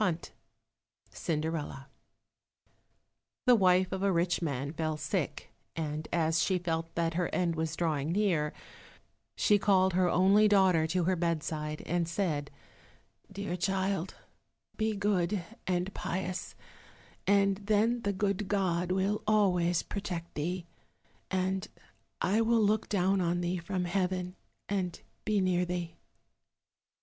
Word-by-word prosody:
21 175 Hz, -5 st, -1 dB, 0.8 s
Cinderella 155 Hz, -4 st, -3 dB, 1.6 s
The 250 Hz, -, +7 dB
wife 185 Hz, -4 st, +4 dB
of 190 Hz, 0 st, -3 dB
a 200 Hz, 0 st, +3 dB
rich 175 Hz, 0 st, +1 dB
man 140 Hz, -2 st, -2 dB
fell 155 Hz, -1 st, -2 dB
sick, 145 Hz, -2 st, -3 dB, 0.2 s
and 155 Hz, -1 st, -3 dB
as 165 Hz, -1 st, +2 dB
she 190 Hz, -, +2 dB
felt 165 Hz, -2 st, -3 dB
that 165 Hz, -1 st, 0 dB
her 175 Hz, 0 st, 0 dB
end 175 Hz, -2 st, 0 dB
was 160 Hz, 0 st, -2 dB
drawing 155 Hz, -2 st, 0 dB
near, 170 Hz, -6 st, +1 dB, 0.8 s
she 205 Hz, -1 st, +4 dB
called 190 Hz, -2 st, +3 dB
her 180 Hz, 0 st, +3 dB
only 195 Hz, +4 st, +5 dB
daughter 190 Hz, -6 st, +4 dB
to 180 Hz, +2 st, 0 dB
her 185 Hz, +2 st, +2 dB
bedside 155 Hz, -3 st, -2 dB
and 170 Hz, 0 st, 0 dB
said, 160 Hz, -6 st, -1 dB, 0.8 s
"Dear 200 Hz, -2 st, -3 dB
child, 190 Hz, 0 st, -1 dB, 0.6 s
be 220 Hz, -1 st, 0 dB
good 200 Hz, -2 st, 0 dB, 0.2 s
and 180 Hz, +1 st, 0 dB
pious, 185 Hz, 0 st, -4 dB, 0.7 s
and 200 Hz, -1 st, +4 dB
then 215 Hz, +4 st, +1 dB
the 200 Hz, -, 0 dB
good 200 Hz, 0 st, -1 dB
God 180 Hz, -3 st, 0 dB
will 195 Hz, +3 st, +1 dB
always 180 Hz, -5 st, +3 dB
protect 175 Hz, -4 st, -5 dB
thee, 175 Hz, +4 st, -3 dB, 0.6 s
and 190 Hz, 0 st, -1 dB, 0.5 s
I 205 Hz, +5 st, +2 dB
will 230 Hz, 0 st, +3 dB
look 215 Hz, +1 st, +1 dB
down 195 Hz, -1 st, +2 dB
on 175 Hz, 0 st, 0 dB
thee 175 Hz, +1 st, -1 dB
from 180 Hz, +1 st, -2 dB
heaven 180 Hz, 0 st, -1 dB, 0.3 s
and 185 Hz, -3 st, -2 dB, 0.3 s
be 215 Hz, -2 st, +2 dB
near 180 Hz, -1 st, +2 dB
thee." 175 Hz, -1 st, -3 dB
180 Hz, 130 wpm, -31 LUFS, 165-195 Hz, 1.6 s, The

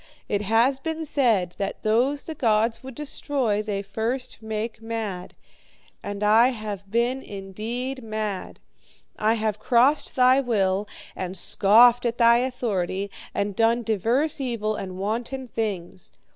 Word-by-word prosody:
It 205 Hz, -1 st, 0 dB
has 230 Hz, +6 st, +2 dB
been 320 Hz, +2 st, -4 dB
said, 225 Hz, -, +1 dB
that 195 Hz, -, -3 dB
those 245 Hz, +6 st, +2 dB
the 320 Hz, -, -5 dB
gods 225 Hz, -4 st, +1 dB
would 260 Hz, -1 st, -9 dB
destroy 270 Hz, -6 st, -1 dB
they 205 Hz, -2 st, -3 dB
first 225 Hz, +6 st, -3 dB
make 220 Hz, +1 st, -4 dB
mad. 220 Hz, -5 st, -5 dB, 0.7 s
And 205 Hz, 0 st, -5 dB
I 220 Hz, +3 st, +6 dB
have 210 Hz, -5 st, -5 dB
been 240 Hz, +4 st, 0 dB
indeed 225 Hz, +7 st, -5 dB
mad. 215 Hz, -3 st, -4 dB, 0.6 s
I 220 Hz, +2 st, +3 dB
have 215 Hz, -2 st, -1 dB
crossed 250 Hz, +6 st, +3 dB
thy 255 Hz, +1 st, +5 dB
will, 205 Hz, -5 st, 0 dB, 0.3 s
and 185 Hz, 0 st, -5 dB
scoffed 235 Hz, +7 st, +5 dB
at 235 Hz, -, -2 dB
thy 235 Hz, -1 st, +6 dB
authority, 200 Hz, -6 st, -2 dB, 0.2 s
and 200 Hz, -1 st, -1 dB
done 230 Hz, +2 st, +2 dB
divers 235 Hz, -, 0 dB
evil 225 Hz, -4 st, -1 dB
and 185 Hz, -2 st, -6 dB
wanton 235 Hz, +6 st, -3 dB
things. 190 Hz, -6 st, -4 dB
225 Hz, 135 wpm, -24 LUFS, 205-250 Hz, 0.7 s, I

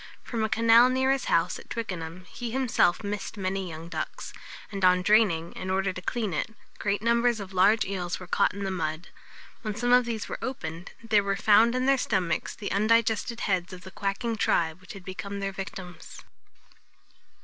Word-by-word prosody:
From 230 Hz, -2 st, -3 dB
a 220 Hz, -, 0 dB
canal 230 Hz, +2 st, +6 dB
near 260 Hz, +1 st, +2 dB
his 270 Hz, -2 st, 0 dB
house 165 Hz, +2 st, +1 dB
at -, -, -15 dB
Twickenham 180 Hz, -5 st, -5 dB
he 240 Hz, +5 st, -6 dB
himself 240 Hz, -8 st, +2 dB
missed 205 Hz, 0 st, -4 dB
many 190 Hz, -1 st, -2 dB
young 160 Hz, +1 st, -8 dB
ducks; -, -, -5 dB, 0.4 s
and 195 Hz, -2 st, -5 dB
on 180 Hz, 0 st, +5 dB
draining, 190 Hz, -6 st, +3 dB
in 185 Hz, -, -6 dB
order 190 Hz, 0 st, 0 dB
to 185 Hz, -, -7 dB
clean 215 Hz, -1 st, -2 dB
it, 210 Hz, +8 st, -3 dB, 0.2 s
great 200 Hz, 0 st, -1 dB
numbers 235 Hz, 0 st, +2 dB
of 195 Hz, -1 st, -8 dB
large 205 Hz, +4 st, +4 dB
eels 180 Hz, -3 st, -3 dB
were 185 Hz, -, -8 dB
caught 180 Hz, -, +2 dB
in 200 Hz, +1 st, -6 dB
the 195 Hz, -, -2 dB
mud. 160 Hz, -2 st, -3 dB, 0.5 s
When 215 Hz, -2 st, -4 dB
some 245 Hz, +2 st, +1 dB
of 250 Hz, 0 st, +6 dB
these 225 Hz, -3 st, -3 dB
were -, -, -5 dB
opened, 170 Hz, -9 st, -5 dB, 0.2 s
there 210 Hz, -2 st, +4 dB
were 200 Hz, 0 st, 0 dB
found 220 Hz, +4 st, +5 dB
in 255 Hz, 0 st, 0 dB
their 275 Hz, 0 st, +4 dB
stomachs 190 Hz, -8 st, -1 dB
the 205 Hz, -, -5 dB
undigested 230 Hz, +2 st, +2 dB
heads 185 Hz, -2 st, -1 dB
of 180 Hz, -, -9 dB
the 190 Hz, +1 st, -11 dB
quacking 210 Hz, +4 st, -2 dB
tribe 165 Hz, -3 st, +1 dB
which 185 Hz, -, -10 dB
had 195 Hz, -2 st, -11 dB
become 200 Hz, +2 st, -6 dB
their 195 Hz, 0 st, -2 dB
victims. 190 Hz, -3 st, -8 dB
200 Hz, 195 wpm, -27 LUFS, 185-230 Hz, 0.5 s, canal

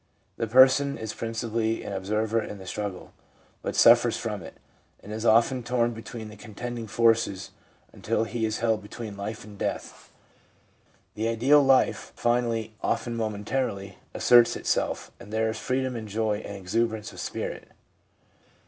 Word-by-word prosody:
The 115 Hz, -, -1 dB
person 130 Hz, +4 st, +5 dB
is 110 Hz, -1 st, -5 dB
principally 115 Hz, 0 st, -2 dB
an 100 Hz, -, -5 dB
observer 105 Hz, +4 st, 0 dB
in 105 Hz, -, -7 dB
the 95 Hz, -, -11 dB
struggle, 100 Hz, -1 st, -5 dB, 0.5 s
but -, -, -4 dB
suffers -, -, +6 dB
from -, -, -4 dB
it, -, -, -10 dB, 0.5 s
and 105 Hz, -, -8 dB
is 110 Hz, +2 st, -2 dB
often 120 Hz, +3 st, +4 dB
torn 120 Hz, 0 st, 0 dB
between 115 Hz, -1 st, -8 dB
the 105 Hz, -, -11 dB
contending 115 Hz, +2 st, -6 dB
forces 115 Hz, -4 st, +2 dB, 0.4 s
until -, -, -1 dB
he 115 Hz, +1 st, -3 dB
is 110 Hz, 0 st, -1 dB
held 110 Hz, -2 st, +1 dB
between 105 Hz, 0 st, -8 dB
life 105 Hz, +2 st, -5 dB
and 105 Hz, -1 st, -13 dB
death. -, -, -4 dB, 1.0 s
The 110 Hz, +1 st, -2 dB
ideal 130 Hz, +6 st, +5 dB
life 135 Hz, -1 st, +2 dB
finally, 115 Hz, -2 st, 0 dB
often 120 Hz, -1 st, -1 dB
momentarily, 105 Hz, -2 st, -3 dB, 0.2 s
asserts 120 Hz, -1 st, +6 dB
itself, -, -, -1 dB
and 105 Hz, -, -12 dB
there 110 Hz, 0 st, +1 dB
is 110 Hz, -, -6 dB
freedom 130 Hz, 0 st, -1 dB
and 110 Hz, -2 st, -5 dB
joy 105 Hz, 0 st, 0 dB
and 100 Hz, -2 st, -7 dB
exuberance 110 Hz, +3 st, -1 dB
of -, -, -10 dB
spirit. -, -, -5 dB
110 Hz, 150 wpm, -26 LUFS, 105-120 Hz, 1.0 s, suffers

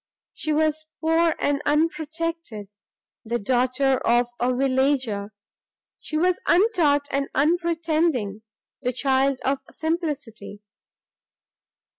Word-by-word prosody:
She 310 Hz, -, -3 dB
was 310 Hz, 0 st, +1 dB
poor 325 Hz, 0 st, +2 dB
and 285 Hz, 0 st, 0 dB
unprotected, 315 Hz, -, -2 dB, 0.5 s
the 235 Hz, +1 st, -1 dB
daughter 255 Hz, +4 st, +1 dB
of 240 Hz, +1 st, +2 dB
a 245 Hz, +1 st, +1 dB
villager; 260 Hz, -5 st, 0 dB, 0.7 s
she 310 Hz, -, -4 dB
was 360 Hz, +2 st, +1 dB
untaught 340 Hz, -8 st, +3 dB
and 275 Hz, 0 st, -1 dB
unpretending, 320 Hz, -, +1 dB, 0.4 s
the 250 Hz, -1 st, -1 dB
child 270 Hz, +1 st, +1 dB
of 275 Hz, 0 st, +1 dB
simplicity! 290 Hz, -, -4 dB
285 Hz, 95 wpm, -24 LUFS, 250-320 Hz, 0.7 s, untaught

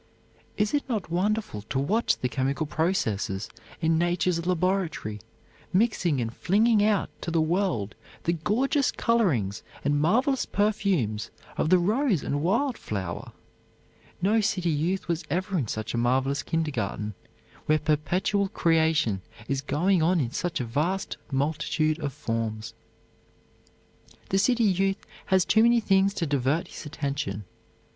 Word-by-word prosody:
Is 210 Hz, 0 st, +1 dB
it 290 Hz, -, +2 dB
not 210 Hz, -9 st, -2 dB
wonderful 195 Hz, -, 0 dB
to 110 Hz, -, -4 dB
watch 205 Hz, +13 st, +1 dB
the 125 Hz, -, -1 dB
chemical 135 Hz, +4 st, -1 dB
processes 110 Hz, -, -1 dB, 0.3 s
in 160 Hz, 0 st, +2 dB
nature's 175 Hz, 0 st, +1 dB
laboratory, 180 Hz, -, 0 dB, 0.5 s
mixing 185 Hz, -, +2 dB
and 115 Hz, -1 st, -3 dB
flinging 215 Hz, +2 st, +3 dB
out 210 Hz, -2 st, +1 dB
to -, -, -3 dB
the 165 Hz, 0 st, +1 dB
world 160 Hz, -, 0 dB, 0.3 s
the 170 Hz, -, +1 dB
gorgeous 245 Hz, -, +1 dB
colorings 140 Hz, -, +1 dB, 0.2 s
and 145 Hz, 0 st, +2 dB
marvelous 250 Hz, -, +2 dB
perfumes 185 Hz, -, 0 dB, 0.3 s
of -, -, 0 dB
the 185 Hz, -, +6 dB
rose 210 Hz, -, +1 dB
and 145 Hz, 0 st, -1 dB
wild 230 Hz, -, +1 dB
flower! 95 Hz, -5 st, -5 dB, 0.9 s
No 215 Hz, +3 st, +4 dB
city 185 Hz, -5 st, 0 dB
youth 165 Hz, +6 st, -1 dB
was 170 Hz, 0 st, -1 dB
ever 185 Hz, +5 st, -1 dB
in 140 Hz, -10 st, 0 dB
such 110 Hz, +1 st, -4 dB
a 120 Hz, -, 0 dB
marvelous 130 Hz, +3 st, +1 dB
kindergarten, 115 Hz, -10 st, -2 dB, 0.5 s
where 155 Hz, -, +4 dB
perpetual 175 Hz, +7 st, +1 dB
creation 160 Hz, -, +2 dB, 0.3 s
is 135 Hz, 0 st, -1 dB
going 165 Hz, +6 st, +1 dB
on 170 Hz, +2 st, +3 dB
in 125 Hz, -5 st, -1 dB
such 170 Hz, +3 st, -2 dB
a 125 Hz, -, -2 dB
vast 160 Hz, +11 st, -1 dB
multitude 155 Hz, +2 st, 0 dB
of 145 Hz, -3 st, -2 dB
forms. 115 Hz, -5 st, -3 dB, 1.6 s
The 195 Hz, -, +2 dB
city 240 Hz, +3 st, +3 dB
youth 195 Hz, -1 st, +1 dB, 0.2 s
has 190 Hz, -2 st, +3 dB
too 220 Hz, -, +4 dB
many 235 Hz, +1 st, +5 dB
things 195 Hz, -2 st, +2 dB
to 175 Hz, -, -1 dB
divert 140 Hz, +2 st, 0 dB
his -, -, -8 dB
attention. 140 Hz, -8 st, -3 dB
165 Hz, 140 wpm, -27 LUFS, 135-195 Hz, 1.6 s, the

